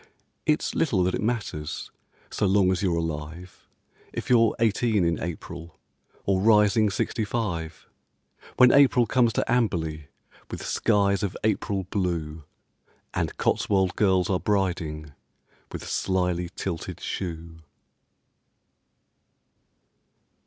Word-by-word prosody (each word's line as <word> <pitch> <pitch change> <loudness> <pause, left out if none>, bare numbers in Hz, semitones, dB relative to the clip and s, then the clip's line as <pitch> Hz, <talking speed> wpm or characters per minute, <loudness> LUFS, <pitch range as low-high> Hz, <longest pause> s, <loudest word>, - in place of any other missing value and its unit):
It's 150 0 +1
little 120 - +1
that 90 - 0
it - - -2
matters, 105 -10 -3 0.4
So 100 - 0
long 95 -1 +3
as 90 - -1
you're 90 -4 +1
alive, 80 +2 -6 0.4
If - - -5
you're 115 -2 +4
eighteen 110 -3 +2
in 85 0 0
April, 85 0 -7 0.5
Or 95 -1 +1
rising 105 0 +4
sixty 110 +4 -2
five, 95 -8 -4 0.7
When 125 -1 +7
April 135 -3 +5
comes 120 +1 +2
to - - 0
Amberley 80 - 0 0.4
With - - -6
skies 100 -1 +2
of 100 -3 -3
April 105 -2 0
blue, 80 -5 -2 0.7
And - - -2
Cotswold 95 -3 +1
girls 95 -3 +2
are 95 -2 0
briding 85 -7 -1 0.6
With - - -7
slyly 90 -2 -1
tilted 85 -4 -5
shoe. 85 -3 -5
95 Hz, 110 wpm, -25 LUFS, 85-105 Hz, 0.7 s, When